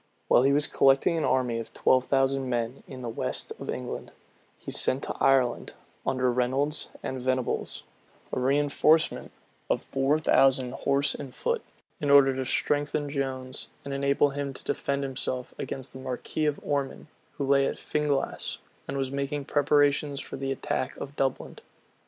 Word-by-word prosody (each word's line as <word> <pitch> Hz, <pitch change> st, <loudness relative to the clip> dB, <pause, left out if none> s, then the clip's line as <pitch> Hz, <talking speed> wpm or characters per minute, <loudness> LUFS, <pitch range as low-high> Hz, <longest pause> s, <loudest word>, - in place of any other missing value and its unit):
While -, -, +6 dB
he 135 Hz, +2 st, +4 dB
was 145 Hz, +1 st, +4 dB
collecting 135 Hz, +5 st, +3 dB
an 160 Hz, -, 0 dB
army 125 Hz, -3 st, +1 dB
of 115 Hz, -, -7 dB
twelve 130 Hz, -1 st, +3 dB
thousand 135 Hz, -1 st, +1 dB
men 120 Hz, +1 st, -2 dB
in 130 Hz, -2 st, -9 dB
the -, -, -4 dB
west 115 Hz, -, -2 dB
of -, -, -7 dB
England, -, -, -5 dB, 0.5 s
he -, -, -8 dB
sent 130 Hz, -, +4 dB
to -, -, -3 dB
Ireland, 130 Hz, -3 st, +2 dB, 0.3 s
under 130 Hz, -1 st, +2 dB
Reynolds 135 Hz, +5 st, +1 dB
and 130 Hz, -1 st, -4 dB
Venables, 130 Hz, 0 st, -1 dB, 0.5 s
a -, -, -1 dB
reënforcement 145 Hz, +4 st, +2 dB, 0.4 s
of -, -, 0 dB
four 135 Hz, +3 st, +1 dB
thousand 135 Hz, -4 st, +3 dB
horse 140 Hz, +1 st, +1 dB
and 135 Hz, -3 st, -8 dB
foot, 475 Hz, -1 st, -1 dB, 0.4 s
in 145 Hz, -, -1 dB
order 140 Hz, -2 st, +6 dB
to 130 Hz, 0 st, -2 dB
strengthen 145 Hz, +2 st, 0 dB
Jones, 130 Hz, -2 st, -3 dB, 0.2 s
and 140 Hz, -, -4 dB
enable 140 Hz, +1 st, +2 dB
him 140 Hz, -1 st, -4 dB
to -, -, -9 dB
defend 140 Hz, 0 st, -1 dB
himself 130 Hz, -1 st, -3 dB
against 135 Hz, -1 st, -3 dB
the 130 Hz, -, -9 dB
marquis 130 Hz, +4 st, -2 dB
of 150 Hz, -, -1 dB
Ormond, 140 Hz, -2 st, -2 dB, 0.3 s
who 140 Hz, -, -3 dB
lay 140 Hz, 0 st, +4 dB
at -, -, -2 dB
Finglass, 150 Hz, -2 st, -1 dB, 0.3 s
and 140 Hz, -, -3 dB
was 135 Hz, -1 st, -1 dB
making 140 Hz, +1 st, -3 dB
preparations 145 Hz, 0 st, +2 dB
for -, -, -7 dB
the 135 Hz, 0 st, -3 dB
attack 130 Hz, 0 st, -2 dB
of 140 Hz, +1 st, -7 dB
Dublin. 135 Hz, -2 st, -2 dB
135 Hz, 165 wpm, -27 LUFS, 130-145 Hz, 0.5 s, While